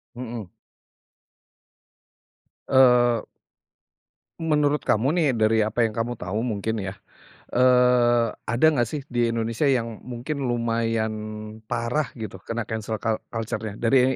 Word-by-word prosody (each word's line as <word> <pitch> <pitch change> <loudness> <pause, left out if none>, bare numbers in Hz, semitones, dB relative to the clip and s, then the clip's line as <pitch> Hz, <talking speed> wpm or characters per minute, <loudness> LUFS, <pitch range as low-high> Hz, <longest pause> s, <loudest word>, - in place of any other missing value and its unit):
Mhm. 120 -5 -6 2.2
Eee 125 -3 +5 1.2
menurut 150 -2 +2
kamu 130 +9 +2
nih 170 -3 +2
dari 110 -2 +2
apa 115 +2 +1
yang 110 - -6
kamu 115 +1 -2
tahu 105 +5 -3
mungkin 110 -2 -2
ya, 95 0 -6 0.5
eee, 125 -2 +4 0.2
ada 120 +7 +2
nggak 120 -6 +1
sih 150 +4 -4
di 120 -1 +2
Indonesia 115 +4 0
yang 115 -5 0
mungkin 125 +4 -4
lumayan 115 -3 0 0.5
parah 120 +5 -1
gitu 110 -5 -7
kena 115 0 -2
cancel 110 0 -4
cul 110 +1 -1
culture-nya? 110 -2 -4
Dari 125 +3 +3
115 Hz, 120 wpm, -24 LUFS, 110-125 Hz, 2.2 s, Eee